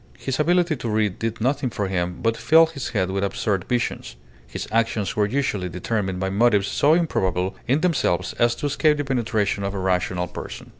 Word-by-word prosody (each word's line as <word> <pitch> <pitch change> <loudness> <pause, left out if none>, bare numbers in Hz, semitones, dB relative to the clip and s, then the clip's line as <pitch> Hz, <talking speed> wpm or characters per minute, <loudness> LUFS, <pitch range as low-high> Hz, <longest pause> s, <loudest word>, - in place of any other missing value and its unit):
His 135 +1 -3
ability 175 0 +2
to 120 - -4
read 105 -3 0
did 115 0 -3
nothing 130 +2 0
for 105 -3 -3
him 90 -1 -2
but 115 0 +2
fill 165 +6 +5
his 160 -5 -6
head 95 -4 -1
with 100 +1 -1
absurd 100 -1 -1
visions. 120 - -2 0.3
His - - -6
actions 110 -3 0
were 105 -1 +2
usually 105 -7 -1
determined 95 +1 -2
by 95 0 -1
motives 105 -1 +3
so 150 +3 +3
improbable 95 - 0
in 135 +5 +2
themselves 135 - 0
as 120 0 +3
to - - -5
escape 150 +1 +2
the 145 - -2
penetration 110 -6 0
of 100 +1 -3
a - - -2
rational 90 -1 0
person. - - -8
110 Hz, 195 wpm, -23 LUFS, 95-135 Hz, 0.3 s, fill